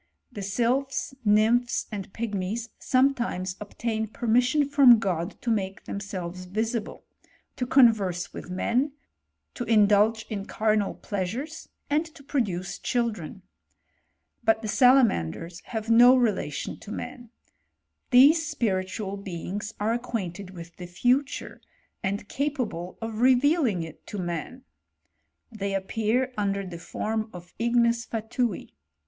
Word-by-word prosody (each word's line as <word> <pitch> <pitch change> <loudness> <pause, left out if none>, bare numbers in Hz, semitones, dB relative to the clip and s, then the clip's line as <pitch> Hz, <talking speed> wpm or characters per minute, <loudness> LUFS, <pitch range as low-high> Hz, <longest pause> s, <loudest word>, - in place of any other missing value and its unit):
The 210 - -7
sylp! 240 +7 +1 0.3
nymphs, 225 +3 +3
and 195 -3 -6
pigmies, 220 +1 -3
sometimes 240 -9 +1
obtain 220 +1 -3
permissi 245 +6 +2
from 275 -4 +7
God 180 -3 -2
to 235 - 0
make 195 -3 -2
themselves 185 -3 -5
visible, 220 +4 -3 0.5
to 250 - -3
convei 205 -9 +3
with - - -8
men, 245 +10 0 0.6
to 245 - -4
indulge 215 0 +4
in 205 -2 -5
carnal 215 -2 +1
pleasures, 225 - -4 0.2
and 300 +2 +2
to 280 - -14
pid^ 275 -3 +1
duce 185 -1 -5
children. 225 - -2 1.0
But 225 0 +2
the - - -2
salamanders 195 - +3
have 220 -1 -3
no 245 +3 +8
relatitiff' 215 - -1
to 210 - -9
man. 245 0 -7 0.8
These 280 +6 +7
spiritual 200 - -2
beings 195 +2 -5
are 215 +2 +1
acquainted 200 -6 -4
wlff 170 -2 -11
the 180 - -7
future, 250 +10 0 0.4
and 200 +1 -2
capable 250 - -3
of 225 0 -4
revealing 255 - +3
it 160 -1 -11
to 210 - -6
man. 175 -4 -4 0.9
TfaMlf 200 -1 -1
appear 225 +6 -1
under 200 -1 -1
the 175 -2 -7
form 220 +5 -3
of 175 -1 -11
ignesfatui. 235 -1 0
220 Hz, 120 wpm, -26 LUFS, 190-245 Hz, 1.0 s, no